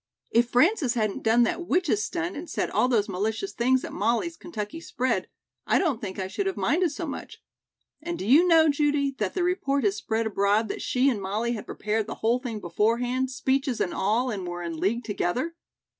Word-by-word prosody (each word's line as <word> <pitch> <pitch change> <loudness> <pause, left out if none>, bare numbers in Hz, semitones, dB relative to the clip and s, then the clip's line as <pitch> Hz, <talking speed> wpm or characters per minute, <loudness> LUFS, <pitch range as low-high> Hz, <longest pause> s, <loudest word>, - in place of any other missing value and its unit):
"If 235 +1 +3
Frances 270 - +3
hadn't 215 -3 -1
done 225 +2 +4
that 345 +9 -1
witch's 310 - +1
stunt 345 - -3
and 320 +3 -7
said - - -2
all - - +3
those 230 -4 +2
malicious 220 - -2
things 255 +2 +2
at - - -8
Molly's 235 +11 0
Kentucky 270 -1 -6
spread, 255 -5 -1 0.4
I - - +4
don't 295 - 0
think 190 -3 -5
I 190 -1 -2
should 390 - -2
have 385 - -2
minded 345 +4 +2
so 315 +4 -5
much. 285 - -7 0.6
And 340 +2 -4
do - - -5
you 295 - +6
know, 325 -2 +6
Judy, 290 -1 +2
that 210 -3 -1
the 360 - +1
report 280 -7 0
has 200 -2 +2
spread 225 +2 -1
abroad 210 +1 +1
that - - -4
she 255 +2 +1
and 235 -7 +1
Molly 210 +5 -1
had 220 -3 -5
prepared 215 0 -2
the - - -5
whole 235 +3 +1
thing 240 -4 -5
beforehand, 235 +8 0
speeches 265 -1 0
and 175 - 0
all 230 +6 +1
and 190 -4 -4
were 175 0 -5
in 165 -1 -4
league 220 +8 0
together? 230 - -2
240 Hz, 205 wpm, -26 LUFS, 210-290 Hz, 0.6 s, you